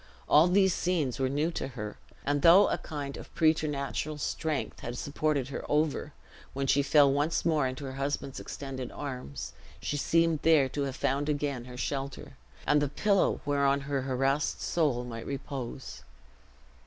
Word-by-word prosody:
All 155 +4 +6
these 190 0 +4
scenes 165 -10 0
were 130 -1 +1
new 150 +5 0
to 165 - -3
her; 105 -5 -6 0.3
and 145 0 +1
though 175 +6 +7
a - - -1
kind 145 -3 -5
of - - -11
preternatural 155 -2 0
strength 150 0 -2
had 120 +1 -5
supported 145 -2 -1
her - - -5
over, 150 0 +1 0.4
when 135 0 -2
she 140 +1 +3
fell 140 -1 +5
once 145 +4 0
more 155 -5 +2
into 130 +2 -5
her 135 - -5
husband's 135 0 -3
extended 135 -3 -6
arms, 125 - -6 0.3
she 145 - -2
seemed 165 +1 +2
there 155 -5 +5
to 145 - -3
have 135 -1 -4
found 140 +3 0
again 145 -4 -1
her 125 0 -9
shelter, 135 +1 -4 0.3
and 150 0 +4
the 145 - 0
pillow 200 +5 +2
whereon 140 -1 +2
her 140 -1 -2
harassed 135 +3 0
soul 145 -8 0
might 115 -2 -7
repose. 135 -2 -6
140 Hz, 165 wpm, -29 LUFS, 135-155 Hz, 0.4 s, though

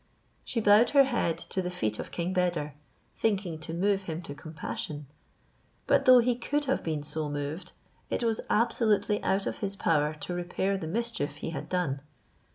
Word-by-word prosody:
She 235 - -2
bowed 210 +2 +6
her 275 - +10
head 240 -11 0
to 190 - -3
the 180 - -2
feet 110 -12 -2
of - - -5
King 175 +2 -2
Beder, 175 -5 0 0.4
thinking 190 -7 0
to 155 - -6
move 195 +3 +1
him 165 +2 -4
to 145 - -6
compassion; 150 -1 -5 0.8
but - - +3
though 255 -1 +9
he 245 0 +3
could 290 +5 -1
have 270 - 0
been 155 -3 -2
so 150 0 -2
moved, 145 +5 -4 0.4
it - - -1
was 225 -1 +1
absolutely 215 -2 +2
out 195 +1 +1
of - - -3
his 200 -1 -2
power 155 -4 +1
to 150 +4 -5
repair 180 +2 -1
the 190 -5 -4
mischief 225 -6 -2
he 145 - -5
had - - -6
done. 150 -7 -1
180 Hz, 180 wpm, -29 LUFS, 155-210 Hz, 0.8 s, her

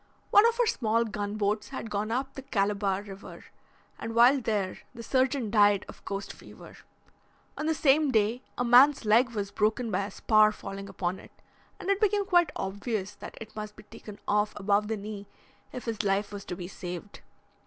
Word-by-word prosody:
One 415 +3 +7
of 465 +1 -1
our 485 - +4
small 230 - +1
gunboats 210 0 -2
had 230 -5 -6
gone 210 +1 -2
up 260 +4 -2
the 270 - -7
Calabar 200 -4 0
river, 195 -1 -11 0.5
and 225 0 -5
while 250 +4 +6
there 205 -5 -2 0.2
the 230 - -8
surgeon 260 -3 0
died 205 -2 +4
of - - -13
coast 200 0 -5
fever. - - -14 0.8
On 305 - -3
the 320 - +1
same 295 0 +3
day 225 0 +1 0.2
a 245 - 0
man's 250 +2 +6
leg 230 +4 +4
was 200 -1 -3
broken 220 +2 0
by 195 +1 0
a - - -6
spar 215 -1 +4
falling 195 -1 -8
upon 180 +1 -3
it, - - -15 0.5
and - - -8
it 395 +1 0
became 410 -1 +2
quite 350 -3 +3
obvious 205 +1 -3
that - - -10
it 220 -1 -10
must 210 -1 -6
be 215 - -14
taken 210 0 -12
off 210 0 +1
above 205 +1 +1
the 220 0 -2
knee 205 0 -7 0.4
if 250 - -7
his 225 -2 -2
life 200 0 0
was 200 -1 -7
to 180 - -5
be 175 -1 -7
saved. 180 +1 -8
215 Hz, 190 wpm, -28 LUFS, 200-250 Hz, 0.8 s, One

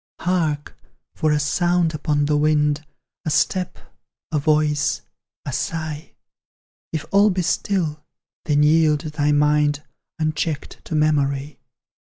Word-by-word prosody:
Hark! 160 -5 -1 0.4
for 155 - +1
a 150 - +3
sound 175 +2 +1
upon 145 -1 0
the 150 0 +1
wind, 150 0 +2 0.4
A - - -2
step, 180 +4 0 0.5
a 155 - +1
voice, 150 0 +1 0.4
a 140 - -4
sigh; 155 +1 -4 0.8
If 160 -2 -3
all 200 +1 +5
be 185 -2 0
still, 165 -4 -1 0.4
then 150 -2 +3
yield 155 -1 +4
thy 150 -2 -1
mind, 150 0 +2 0.3
Unchecked, 155 -1 -3
to 160 - -4
memory. 145 -2 0
150 Hz, 120 wpm, -22 LUFS, 150-160 Hz, 0.8 s, all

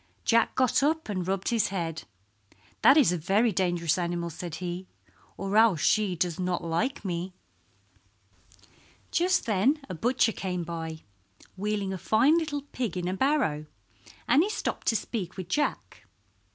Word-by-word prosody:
Jack 230 0 +3
got 255 -1 +3
up 315 -1 0
and 185 -3 -2
rubbed 190 0 -1
his 230 -3 +2
head. 165 -5 -4 0.8
"That 275 - +7
is 270 - +5
a 180 - -1
very 205 +8 +2
dangerous 175 -3 0
animal," 170 -1 -2
said 170 0 -6
he, 180 +1 -5 0.5
"or 195 +1 -3
else 220 -8 +5
she 210 -4 +2
does 170 0 -1
not 180 -1 -1
like 205 +10 -2
me." 180 0 -3 1.8
Just 370 +2 +2
then 230 +7 +2
a - - -4
butcher 230 +6 +2
came 180 -4 -3
by, 160 -1 -6 0.5
wheeling 200 0 -2
a 190 - -5
fine 245 - +4
little 290 -3 -3
pig 245 - -4
in 175 -1 -2
a 185 - -1
barrow, 195 - 0 0.6
and 290 - +5
he 390 - +1
stopped 430 - -3
to 225 - +3
speak 200 -5 -4
with 185 -2 -5
Jack. 295 +9 -2
190 Hz, 155 wpm, -27 LUFS, 175-240 Hz, 1.8 s, That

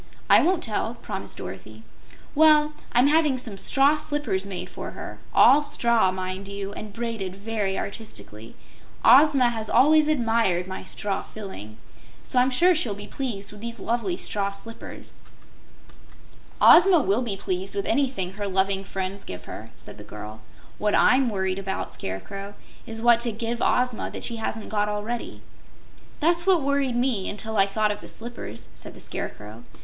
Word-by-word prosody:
"I - - +8
won't 355 0 +1
tell," 225 +1 -1
promised 195 - -6
Dorothy. 95 +4 -9 0.5
"Well, 300 0 +5 0.2
I'm 245 +2 +4
having 300 -2 +3
some 220 -6 -4
straw 280 +6 +3
slippers 290 -11 -1
made 180 -2 -5
for - - -8
her - - -8
all 290 - +6
straw, 235 -8 +2
mind 185 +1 -4
you, 200 0 -5
and 215 -1 -8
braided 220 -4 -4
very 200 -1 -2
artistically. 115 - -7 0.5
Ozma 270 0 +6
has 220 -2 -3
always 305 +2 +5
admired 225 - +1
my 190 0 -7
straw 200 0 -3
filling, 150 - -9 0.5
so 250 - +1
I'm 250 +1 +4
sure 345 +8 +4
she'll 240 -11 0
be 205 +1 -8
pleased 210 -5 -5
with 210 0 -12
these 235 0 -6
lovely 240 - -1
straw 200 - 0
slippers." 210 +3 -9 1.4
"Ozma 360 -1 +8
will 210 -2 +1
be 220 -6 -2
pleased 190 0 -4
with 200 - -2
anything 250 -8 0
her 205 0 -4
loving 195 0 +1
friends 195 0 -5
give 90 -1 -8
her," - - -9
said - - -11
the - - -9
girl. 105 +1 -9 0.4
"What 210 0 +1
I'M 255 0 +4
worried 190 -2 -1
about, 195 0 -4
Scarecrow, 195 - -6 0.3
is 225 -1 -6
what 235 -1 +6
to 235 0 -1
give 230 +2 -3
Ozma 250 -2 +1
that - - -8
she 235 - -2
hasn't 220 0 -4
got 210 -1 0
already." 210 +3 -4 0.8
"That's 340 +3 +2
what 360 -6 +4
worried 280 -3 +1
me, 240 -6 0
until 220 +2 -3
I 195 -1 +4
thought 210 +1 +1
of 205 - -6
the - - -11
slippers," 225 - -7
said - - -10
the - - -12
Scarecrow. 105 +3 -7
215 Hz, 165 wpm, -25 LUFS, 195-255 Hz, 1.4 s, I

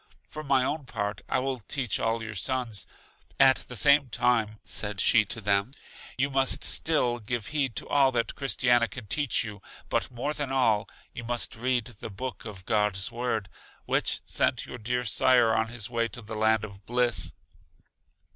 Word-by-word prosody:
For 155 - -7
my 135 -3 +3
own 145 +1 -2
part, 105 -3 -3
I - - +1
will 130 0 -2
teach 125 0 -1
all 115 0 0
your 110 -1 -6
sons. 115 0 -2 0.5
At 135 -1 +7
the 125 - -6
same 140 +5 +5
time, 115 -3 +1
said 105 -2 -2
she 110 +3 +5
to 110 - -5
them: 100 +4 +1 0.4
You 140 +2 +1
must 135 -1 +2
still 125 -7 +2
give 115 0 -4
heed 135 -6 0
to - - -2
all 140 -2 +4
that 115 -1 0
Christiana 120 -3 +2
can 120 +2 -9
teach 145 +6 +1
you, 105 -2 -8 0.3
but - - 0
more 125 +5 -3
than 145 -3 -4
all, 115 -5 +2 0.2
you 120 - -7
must 120 +1 -3
read 125 0 0
the - - -6
Book 125 +5 -6
of 100 -4 -9
God's 105 -3 +1
Word, 115 -4 -2 0.4
which - - 0
sent - - 0
your 125 - -8
dear 125 +3 -2
sire 120 0 +4
on 110 0 +1
his 115 -3 -3
way 115 -1 0
to 120 0 -9
the 110 +2 -8
land 110 0 +2
of 100 -2 -9
bliss. 120 -1 +1
120 Hz, 180 wpm, -27 LUFS, 110-130 Hz, 0.5 s, At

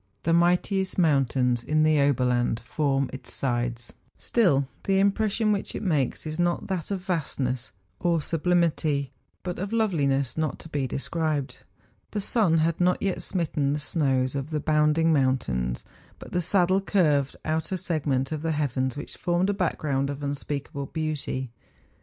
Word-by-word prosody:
The 165 - +2
mightiest 180 +3 +2
mountains 130 -7 +2
in 155 +3 +2
the 155 -2 +4
Oberland 125 -4 +2
form 140 -3 0
its 130 - -7
sides; 120 -2 -2 0.2
still 150 - +2 0.2
the 195 -1 +2
impression 210 +2 +2
which 200 -1 -2
it - - -4
makes 150 - 0
is 155 +2 -4
not 175 0 +1
that 185 -5 -3
of 195 -2 -2
vastness 130 - -2 0.3
or 170 -2 +2
sublimity, 155 -4 +1 0.3
but 180 -2 -4
of 195 +3 -3
loveliness 145 - +1
not 155 -1 -1
to 160 - -12
be 140 -4 -1
described. 150 0 -2 0.5
The 210 - -3
sun 195 -5 +3
had 165 +2 +1
not 180 0 +3
yet 195 -2 -1
smitten 150 -6 0
the 150 - -1
snows 135 -4 0
of 140 +1 -3
the 155 -1 -1
bounding 155 +2 +3
moun¬ 130 -3 +3
tains; 60 - -3 0.3
but - - -11
the 180 - +1
saddle 185 +2 +3
curved 150 -9 +2
out 160 +1 -1
a 190 - 0
segment 150 -7 -1
of 155 -2 -3
the 160 0 0
heavens 130 -3 -1
which 145 - -6
formed 180 +2 +1
a - - -1
background 145 -7 -1
of 140 +1 -5
unspeakable 140 0 -4
beauty. 150 -5 -3
155 Hz, 160 wpm, -26 LUFS, 135-175 Hz, 0.5 s, the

